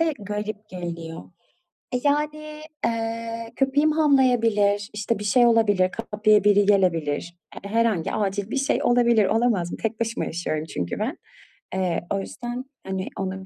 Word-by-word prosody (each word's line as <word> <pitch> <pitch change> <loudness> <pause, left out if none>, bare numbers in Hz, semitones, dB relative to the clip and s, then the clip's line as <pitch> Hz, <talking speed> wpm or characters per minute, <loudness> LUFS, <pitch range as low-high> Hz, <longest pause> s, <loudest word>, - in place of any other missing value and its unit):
de 330 -1 +2
garip 210 +1 -5
geliyor. 170 - -6 0.7
E, - - +2
yani, 300 +1 -1 0.2
eee, 230 0 -3
köpeğim 280 +4 +2
havlayabilir, 230 -9 +3
işte, 210 +1 -2
bir 210 - -5
şey 240 +4 +4
olabilir, 205 -5 +4 0.2
kapıya 210 -1 +4
biri 205 -1 +5
gelebilir. 175 -4 +1 0.3
H 200 - -7
herhangi 225 -6 +1
acil 200 0 -1
bir - - -3
şey 275 +2 +1
olabilir, 235 -3 +4
olamaz 215 -6 +1
mı? - - -5
Tek 225 0 -2
başıma 230 0 -1
yaşıyorum 155 -2 -3
çünkü 90 - -4
ben. - - -2 0.6
Eee, 185 -2 0
o 195 - 0
yüzden, 245 +5 -6 0.2
hani, 190 0 -3
onu 190 0 -4
210 Hz, 145 wpm, -24 LUFS, 190-240 Hz, 0.7 s, biri